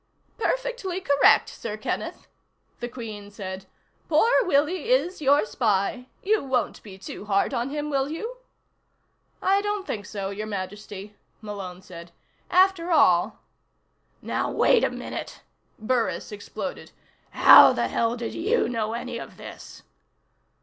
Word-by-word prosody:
"Perfectly 480 Hz, -6 st, -2 dB
correct, 285 Hz, -7 st, +4 dB
Sir 215 Hz, -2 st, -6 dB
Kenneth," 215 Hz, -, -4 dB, 0.5 s
the 240 Hz, -, -3 dB
Queen 215 Hz, -4 st, -8 dB
said. 190 Hz, -2 st, -7 dB, 0.4 s
"Poor 335 Hz, +9 st, +4 dB
Willie 335 Hz, +5 st, +1 dB
is 375 Hz, -9 st, +1 dB
your 285 Hz, -4 st, +4 dB
spy. 215 Hz, +2 st, 0 dB, 0.2 s
You 425 Hz, -1 st, +2 dB
won't 260 Hz, -4 st, -1 dB
be 195 Hz, -3 st, -12 dB
too 190 Hz, +1 st, -9 dB
hard 200 Hz, +5 st, +1 dB
on 240 Hz, +1 st, -1 dB
him, 295 Hz, +1 st, -4 dB
will 275 Hz, 0 st, 0 dB
you?" 450 Hz, +11 st, -5 dB, 1.1 s
"I 390 Hz, +1 st, +3 dB
don't 415 Hz, -1 st, -2 dB
think 205 Hz, -, -5 dB
so, 195 Hz, -2 st, -4 dB
Your 215 Hz, +2 st, -5 dB
Majesty," 205 Hz, 0 st, -7 dB, 0.2 s
Malone 195 Hz, -4 st, -7 dB
said. 170 Hz, -2 st, -11 dB, 0.4 s
"After 370 Hz, -1 st, +3 dB
all 230 Hz, -, +3 dB, 0.4 s
" -, -, -44 dB
"Now -, -, 0 dB
wait 485 Hz, -1 st, +3 dB
a -, -, +3 dB
minute," -, -, -7 dB, 0.4 s
Burris 230 Hz, 0 st, -1 dB
exploded. 205 Hz, -1 st, -7 dB, 0.4 s
"How -, -, +9 dB
the -, -, 0 dB
hell 230 Hz, 0 st, 0 dB
did 235 Hz, -1 st, -5 dB
you 425 Hz, +8 st, +1 dB
know 225 Hz, -2 st, -2 dB
any 240 Hz, 0 st, -5 dB
of -, -, -10 dB
this?" -, -, -11 dB
240 Hz, 135 wpm, -25 LUFS, -, 1.1 s, How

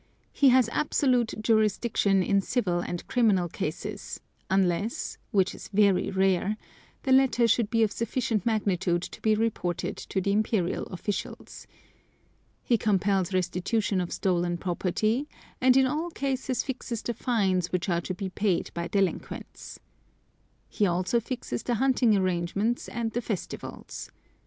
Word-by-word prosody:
He 280 Hz, -, +5 dB
has 255 Hz, -2 st, +5 dB
absolute 250 Hz, -3 st, +1 dB
jurisdiction 215 Hz, -3 st, +2 dB
in 195 Hz, +2 st, +2 dB
civil 190 Hz, -5 st, 0 dB
and 175 Hz, 0 st, -4 dB
criminal 210 Hz, -8 st, +3 dB
cases, 200 Hz, +6 st, -5 dB, 0.3 s
unless 190 Hz, +3 st, 0 dB
(which 195 Hz, -1 st, +2 dB
is -, -, -10 dB
very 200 Hz, -2 st, +3 dB
rare) 190 Hz, +1 st, +1 dB, 0.5 s
the 270 Hz, -, 0 dB
latter 260 Hz, -3 st, +5 dB
should 225 Hz, -1 st, +2 dB
be 225 Hz, 0 st, +3 dB
of 215 Hz, -, +1 dB
sufficient 230 Hz, -3 st, -1 dB
magnitude 185 Hz, -6 st, 0 dB
to -, -, -8 dB
be 215 Hz, -1 st, +3 dB
reported 210 Hz, -6 st, -1 dB
to 190 Hz, -, -3 dB
the 200 Hz, +1 st, 0 dB
Imperial 205 Hz, -3 st, 0 dB
officials. 195 Hz, +2 st, -5 dB, 1.0 s
He 235 Hz, -3 st, +2 dB
compels 195 Hz, -3 st, +1 dB
restitution 185 Hz, +2 st, 0 dB
of 175 Hz, -, -4 dB
stolen 175 Hz, -2 st, 0 dB
property, 215 Hz, -, -1 dB, 0.3 s
and 255 Hz, 0 st, +5 dB
in 265 Hz, -, +5 dB
all 305 Hz, +6 st, -1 dB
cases 265 Hz, -4 st, -2 dB
fixes 245 Hz, -3 st, -4 dB
the 235 Hz, -, -2 dB
fines 195 Hz, -7 st, 0 dB
which 180 Hz, 0 st, -1 dB
are 170 Hz, -2 st, +1 dB
to 185 Hz, -, -4 dB
be 195 Hz, 0 st, -4 dB
paid 190 Hz, -1 st, 0 dB
by 170 Hz, 0 st, -3 dB
delinquents. 195 Hz, -1 st, -3 dB, 0.9 s
He 205 Hz, -, +1 dB
also 185 Hz, +6 st, +1 dB
fixes 230 Hz, -, -4 dB
the 240 Hz, -, -1 dB
hunting 245 Hz, -3 st, +3 dB
arrangements 185 Hz, +5 st, 0 dB
and 235 Hz, -2 st, -3 dB
the 240 Hz, -, -2 dB
festivals. 210 Hz, -5 st, -6 dB
205 Hz, 140 wpm, -27 LUFS, 185-235 Hz, 1.0 s, He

